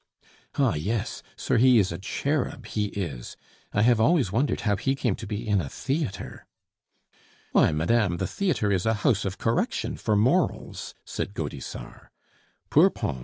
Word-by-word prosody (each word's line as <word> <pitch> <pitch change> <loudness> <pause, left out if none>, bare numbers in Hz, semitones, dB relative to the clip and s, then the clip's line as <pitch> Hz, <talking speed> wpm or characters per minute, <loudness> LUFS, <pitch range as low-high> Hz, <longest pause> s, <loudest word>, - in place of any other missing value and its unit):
"Ah - - +3
yes! 100 +8 -2
sir, - - 0
he 125 +1 +6
is 100 -5 +3
a 85 - -5
cherub, 130 +3 -2
he 105 -1 -1
is. 85 -12 -5 0.3
I 105 - +2
have 120 -1 +4
always 135 - +3
wondered 130 +8 0
how 105 -2 +1
he 135 +7 0
came 125 -6 0
to - - -7
be 105 +1 -4
in 100 -3 +2
a 70 - -5
theatre." 135 - -4 1.0
"Why, - - +4
madame, 85 +4 +1
the 95 - -1
theatre 145 - 0
is 95 +1 +1
a 110 - +3
house 105 -7 +3
of 95 0 -3
correction 115 +1 -1
for 105 - 0
morals," 130 - 0
said 100 - -4
Gaudissart. 70 -5 -6 0.6
"Poor - - +6
Pons! 65 - -4
105 Hz, 165 wpm, -26 LUFS, 95-125 Hz, 1.0 s, he